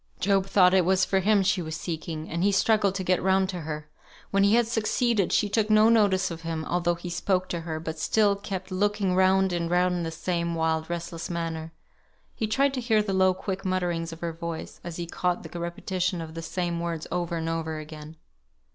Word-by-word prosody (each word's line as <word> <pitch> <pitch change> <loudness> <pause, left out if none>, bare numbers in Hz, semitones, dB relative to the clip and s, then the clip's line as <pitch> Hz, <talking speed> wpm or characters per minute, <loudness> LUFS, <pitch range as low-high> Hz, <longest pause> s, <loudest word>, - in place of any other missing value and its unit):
Job 195 0 +2
thought 185 -2 +5
it 190 -1 +5
was 185 +1 +3
for 190 - +1
him 200 +1 +3
she 195 -1 +1
was 160 -1 -5
seeking, 160 -1 -5
and 170 +2 -2
he 200 - +4
struggled 200 -1 +2
to 190 - -2
get 185 0 +1
round 190 0 +3
to 180 -2 -5
her. 155 -1 -5 0.4
When 195 0 +3
he 200 +2 +5
had 240 0 +4
succeeded, 225 -2 +1
she 210 - +3
took 215 +1 0
no 215 +1 +6
notice 205 -6 +3
of 165 -1 -7
him, 165 -1 -4
although 175 0 0
he 175 +1 -8
spoke 185 +1 0
to 170 - -2
her, 160 -1 -4
but 160 0 -6
still 205 +5 +3
kept 195 -2 -6
looking 200 0 +1
round 190 0 +3
and 170 -1 -1
round 180 +1 +2
in - - -2
the 165 - -2
same 170 +1 -2
wild, 160 0 0
restless 170 -1 -5
manner. 165 -2 -4 0.6
He 220 - -2
tried 270 +5 +2
to 255 - -2
hear 220 -3 +2
the 200 -2 -2
low 190 -1 +3
quick 190 0 -4
mutterings 175 -3 -1
of 165 - -10
her 170 -1 -3
voice, 165 0 -6
as 175 -1 -6
he 175 - -4
caught 180 +1 -1
the 175 - -7
repetition 175 +1 -2
of 160 -1 -7
the 165 - -6
same 170 +1 -2
words 170 -2 -3
over 175 -1 -1
and 165 0 -3
over 160 -1 -2
again. 155 0 -9
180 Hz, 220 wpm, -26 LUFS, 165-195 Hz, 0.6 s, no